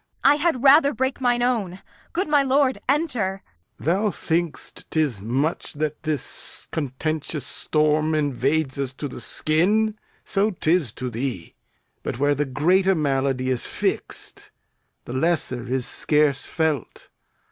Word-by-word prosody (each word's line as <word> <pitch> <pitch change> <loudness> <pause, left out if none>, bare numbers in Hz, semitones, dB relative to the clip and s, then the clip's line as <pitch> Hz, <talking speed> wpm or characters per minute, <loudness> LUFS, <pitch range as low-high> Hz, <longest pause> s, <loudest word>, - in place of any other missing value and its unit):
I 285 +2 +6
had 300 -5 0
rather 280 0 +6
break 260 +3 -1
mine 245 -1 +2
own. 210 -7 0 0.3
Good 370 +3 -1
my 295 -1 +4
lord, 270 0 +2
enter. 245 - 0 0.3
Lear. - - -12
Thou 195 +7 +2
think'st 165 -2 -3
'tis 145 -11 0
much 135 - -1
that 150 0 -3
this 155 -4 -3
contentious 150 0 -3
storm 155 +2 +1
Invades 140 0 0
us 135 -2 -2
to 145 +2 -5
the 125 - -8
skin. 205 - +1 0.2
So 200 +2 +1
'tis 165 - +1
to 125 -1 -4
thee; 115 -7 -4 0.5
But - - -4
where 145 +2 +3
the 145 +1 0
greater 185 +8 +2
malady 135 -3 0
is 125 - -2
fix'd, - - -4 0.6
The 120 - -6
lesser 130 -4 0
is 130 -2 0
scarce 150 -2 +1
felt. 160 -5 -2
155 Hz, 135 wpm, -23 LUFS, 135-210 Hz, 0.6 s, I